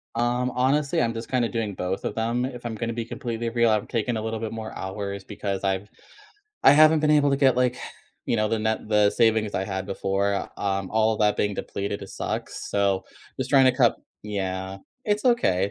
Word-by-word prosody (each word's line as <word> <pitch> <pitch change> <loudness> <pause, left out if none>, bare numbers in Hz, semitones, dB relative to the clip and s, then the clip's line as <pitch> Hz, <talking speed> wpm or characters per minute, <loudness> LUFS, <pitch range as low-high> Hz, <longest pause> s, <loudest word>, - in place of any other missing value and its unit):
Um, 120 +1 0
honestly, 140 +3 +2
I'm 115 -1 0
just 115 0 -6
kinda 125 -3 +1
doing 110 -4 -2
both 90 +1 -3
of - - -3
them. 115 +3 0
If 125 -2 -7
I'm 115 -1 -3
gonna 115 +1 -3
be 115 0 -3
completely 115 -1 -4
real, 115 -1 +2
I'm 105 -1 +1
taking 115 +1 -1
a - - -3
little 110 0 -3
bit 110 0 -4
more 110 -1 -6
hours 100 0 -5
because 100 -1 -4
I've 95 +1 -1 0.8
I - - +9
haven't 155 +1 +6
been 150 0 +2
able 145 -1 +4
to 140 - +2
get, 135 -3 +4
like, 125 0 +2 0.5
you - - +1
know, 105 -1 +1
the 115 - 0
net 110 0 -1
the 105 -1 +4
savings 110 -2 +2
I 95 - 0
had 95 -1 -3
before, 100 0 -1
um, 100 -1 -2
all 110 0 +3
of 110 - -4
that 105 -1 +3
being 105 -1 0
depleted 100 +1 -4
sucks, - - -5
so, 100 -2 +1 0.3
just - - -2
trying 135 -1 +6
to 130 - +5
cut - - +3 0.3
yeah, 95 -2 -3 0.3
it's 210 +1 0
okay, 100 - +2
110 Hz, 210 wpm, -25 LUFS, 100-120 Hz, 0.8 s, I